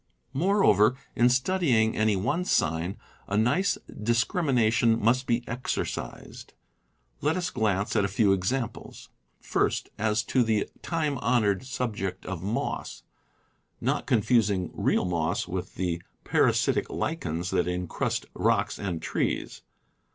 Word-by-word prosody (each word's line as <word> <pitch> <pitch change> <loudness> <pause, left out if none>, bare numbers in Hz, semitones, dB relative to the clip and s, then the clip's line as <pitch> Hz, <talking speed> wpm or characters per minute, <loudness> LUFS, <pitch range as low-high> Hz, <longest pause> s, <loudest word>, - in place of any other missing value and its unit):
Moreover, 135 - +4 0.2
in 120 +1 +5
studying 125 -4 +2
any 110 -1 +2
one 120 - 0
sign, 85 - 0 0.3
a 100 - -1
nice 125 - +2
discrimina 115 +1 +1
tion 115 -1 +3
must 125 +4 +2
be 120 +1 0
exercised. 125 +2 -5 0.7
Let 155 +4 +1
us 180 - -2
glance 105 -4 0
at 105 - +3
a - - +2
few 100 0 +3
ex 95 +3 0
amples: 130 -4 -5 0.3
First, - - 0
as 110 +1 +1
to 130 - +1
the 110 -3 +1
time 155 -5 -1
honored 115 -2 +1
subject 105 -8 -3
of 90 -3 -5
moss 105 +5 -3 0.4
— - - -43
not - - -1
confusing 105 -5 +2
real - - +1
moss 85 -2 -1
with 90 0 -5
the 85 -2 -2 0.2
parasitic - - +2
lichens 85 +3 -3
that - - +1
^ - - 0 0.2
incrust - - -2
rocks - - +1
and 85 -5 -3
trees. - - -2
110 Hz, 135 wpm, -27 LUFS, 95-125 Hz, 0.7 s, in